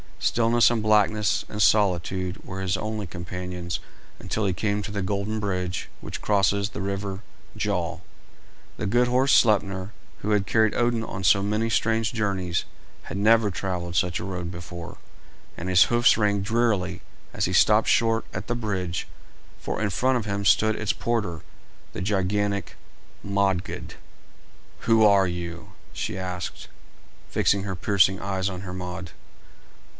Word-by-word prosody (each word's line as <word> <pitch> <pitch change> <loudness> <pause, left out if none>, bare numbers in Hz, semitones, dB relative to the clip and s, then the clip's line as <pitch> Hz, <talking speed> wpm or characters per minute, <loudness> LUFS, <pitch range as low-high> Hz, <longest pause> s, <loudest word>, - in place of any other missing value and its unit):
Stillness 115 0 +3
and 115 -2 0
blackness 105 -2 +2
and 105 - -3
solitude 95 -3 +2
were 95 0 -6
his 95 0 0
only 105 +1 -3
companions 90 +1 -5 0.4
until 110 - -2
he 95 - +1
came 105 +3 -1
to 105 - -6
the 100 -1 -2
golden 100 +3 -2
bridge 90 -3 -2
which - - -7
crosses 100 0 +2
the 100 - -6
river 100 0 -3 0.4
Gjol. - - -2 0.8
The - - -3
good 120 +4 +3
horse 130 +3 +2
Sleipner, 95 -3 +3 0.3
who 105 - -2
had 100 -2 +2
carried 110 +3 +3
Odin 120 -1 +1
on 95 -3 -6
so 100 +2 +5
many 105 +3 0
strange 115 -1 +1
journeys, 95 -5 -1 0.4
had - - -6
never 110 +1 +4
travelled 90 -2 -3
such 90 0 +1
a - - -5
road 90 -3 -4
before, 85 -1 -8 0.6
and 90 +2 -5
his 90 -1 +6
hoofs 120 -1 +4
rang 100 -2 +2
drearily 100 -4 0 0.3
as - - 0
he 95 - -2
stopped 105 +3 +5
short 115 0 +2
at 95 +2 -5
the 120 - -1
bridge, 95 -7 -3 0.5
for - - -4
in 105 - +1
front 130 +6 +2
of 115 - -3
him 100 -1 -2
stood 110 +2 +4
its 105 -2 -1
porter, 105 -9 -2 0.5
the - - -5
gigantic 100 +1 -1 0.5
Modgud. 100 -2 -1 0.9
"Who 115 -1 +4
are 100 -2 +5
you?" 85 -1 -6 0.2
she 110 -3 -3
asked, 90 -2 -5 0.6
fixing 100 -1 +2
her 95 -2 -3
piercing 95 -1 +3
eyes 95 0 -1
on 90 -1 -6
Hermod. 90 -1 -6
100 Hz, 150 wpm, -25 LUFS, 90-110 Hz, 0.9 s, his